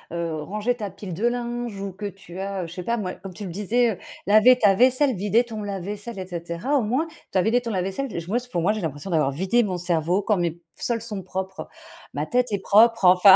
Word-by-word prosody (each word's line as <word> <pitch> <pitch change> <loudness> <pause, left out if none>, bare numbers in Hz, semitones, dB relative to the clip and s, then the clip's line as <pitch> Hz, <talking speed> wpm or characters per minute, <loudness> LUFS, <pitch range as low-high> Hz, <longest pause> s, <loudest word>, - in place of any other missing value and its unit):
heu, 165 -2 -2
rangé 210 +9 -1
ta 210 -4 -4
pile 195 -1 -8
de 210 +8 +1
linge 240 -3 -3
ou 195 0 -4
que 205 +3 -5
tu 190 -2 -10
as 195 -2 -3
je 165 - -9
sais 180 - -5
pas 235 +6 -1
moi 185 -5 -3
comme 195 -1 -10
tu 210 - -6
le 180 - -5
disais, 225 +6 +2
heu, 195 - -5 0.3
laver 215 +5 +7
ta 205 -5 +5
vaisselle, 255 +4 +4
vider 205 +5 +2
ton 225 -3 -6
lave-vaisselle 205 +2 -5
et 190 - -4
cetera 170 - -3
au - - +1
moins 255 +9 0 0.2
tu - - 0
as 185 - +4
vidé 235 +5 +3
ton 235 - -5
lave-vaisselle 195 +6 -2
et - - -1
je 170 - -8
moi 215 +6 +1
s 250 0 -4
pour 175 -9 -2
moi 195 - +4
j'ai 215 - -4
l'impression 160 +3 -4
d'avoir 155 -4 +3
vidé 190 - +2
mon 190 -5 -1
cerveau 175 +2 +1
quand 210 0 +2
mes 170 -1 -1 0.2
sols 235 -2 -1
sont 210 -4 -4
propres, 190 +1 -5 0.5
ma - - -1
tête 250 -2 +1
est 205 - +1
propre 220 +2 +5
enfin. 185 +2 +9
200 Hz, 250 wpm, -24 LUFS, 180-235 Hz, 0.5 s, enfin